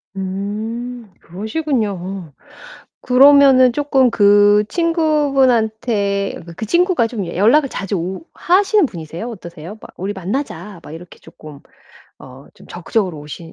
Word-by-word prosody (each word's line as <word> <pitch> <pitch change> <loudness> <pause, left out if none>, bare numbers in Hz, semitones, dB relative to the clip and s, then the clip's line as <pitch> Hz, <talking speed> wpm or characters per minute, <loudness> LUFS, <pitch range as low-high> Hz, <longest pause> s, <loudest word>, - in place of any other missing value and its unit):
음. 215 +5 -5
그러시군요. 195 - -4 0.7
그러면은 265 -1 +6
쪼끔 270 -2 +2
그 205 0 +4
친구분한테 255 - 0
그 170 - -11
그 220 - -6
친구가 345 - +2
좀 220 -5 -5
연락을 225 - +2
자주 195 -4 -4
오 185 - -5
하시는 390 +1 +2
분이세요, 170 - -8
어떠세요? 175 -3 -10
막 - - -12
"우리 195 +3 -4
만나자." 195 - -5
막 150 - -12
이렇게 170 +2 -12
쪼끔 155 -3 -14 0.6
어 130 +1 -14
좀 - - -18
적극적으로 180 -1 -3
오시 150 +3 -10
210 Hz, 275 characters per minute, -18 LUFS, 185-260 Hz, 0.7 s, 그러면은